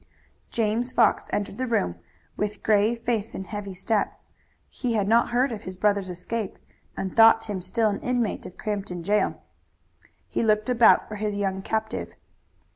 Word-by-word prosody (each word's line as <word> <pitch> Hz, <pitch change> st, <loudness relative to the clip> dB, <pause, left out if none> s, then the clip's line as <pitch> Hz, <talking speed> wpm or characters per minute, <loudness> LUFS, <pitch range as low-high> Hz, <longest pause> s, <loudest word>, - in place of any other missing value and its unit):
James 230 Hz, +2 st, 0 dB
Fox 235 Hz, -, +3 dB
entered 205 Hz, +2 st, -2 dB
the 255 Hz, -, -1 dB
room 90 Hz, -, +1 dB, 0.4 s
with 210 Hz, 0 st, -3 dB
grave 220 Hz, +2 st, +3 dB
face 225 Hz, -3 st, -1 dB
and 190 Hz, -, -5 dB
heavy 205 Hz, -2 st, -6 dB
step. 205 Hz, +3 st, -1 dB, 0.5 s
He 245 Hz, -3 st, -3 dB
had 205 Hz, -3 st, +1 dB
not 230 Hz, +2 st, +4 dB
heard 250 Hz, +2 st, +2 dB
of 215 Hz, -3 st, -5 dB
his 185 Hz, 0 st, -8 dB
brother's 200 Hz, -1 st, +1 dB
escape 185 Hz, +4 st, -4 dB, 0.4 s
and 190 Hz, -, -4 dB
thought 225 Hz, 0 st, +7 dB
him 200 Hz, -4 st, -4 dB
still 220 Hz, +4 st, +1 dB
an 200 Hz, -, -3 dB
inmate 245 Hz, -3 st, -1 dB
of 180 Hz, -, -13 dB
Crampton 200 Hz, -5 st, -4 dB
jail. 210 Hz, +4 st, 0 dB, 0.8 s
He -, -, -2 dB
looked 215 Hz, +2 st, +2 dB
about 240 Hz, -2 st, +5 dB
for 215 Hz, -, -6 dB
his 210 Hz, 0 st, -2 dB
young 195 Hz, -1 st, -1 dB
captive. 220 Hz, +1 st, -3 dB
210 Hz, 165 wpm, -25 LUFS, 200-230 Hz, 0.8 s, thought